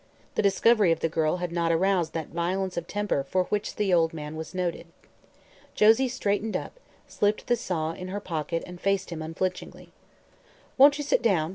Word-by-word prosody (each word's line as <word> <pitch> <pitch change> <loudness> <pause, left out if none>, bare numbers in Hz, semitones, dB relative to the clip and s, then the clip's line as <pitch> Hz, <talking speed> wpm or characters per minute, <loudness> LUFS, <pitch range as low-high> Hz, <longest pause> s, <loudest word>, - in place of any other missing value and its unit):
The - - +1
discovery 205 -1 +4
of 165 - 0
the 165 - +1
girl 160 +1 0
had 180 -1 -4
not 170 -1 0
aroused 180 0 +1
that 160 -2 -4
violence 185 +3 -2
of 170 0 -4
temper 205 -8 -1
for 185 +6 0
which 205 +3 -3
the 200 -3 +1
old 165 -1 +3
man 150 0 -6
was 160 +3 -7
noted. 175 -2 -2 0.9
Josie 225 +5 +5
straightened 215 -3 -1
up, - - -9 0.3
slipped 210 +1 0
the 245 - +2
saw 170 -9 -2
in 180 +2 -7
her 195 +2 -4
pocket 165 -3 -3
and 180 -1 -11
faced 195 -2 0
him 160 -2 -5
unflinchingly. 170 +4 -4 0.8
"Won't 285 +2 +7
you 295 - -3
sit 285 - +1
down?" 170 -8 +2
180 Hz, 185 wpm, -26 LUFS, 165-205 Hz, 0.9 s, Won't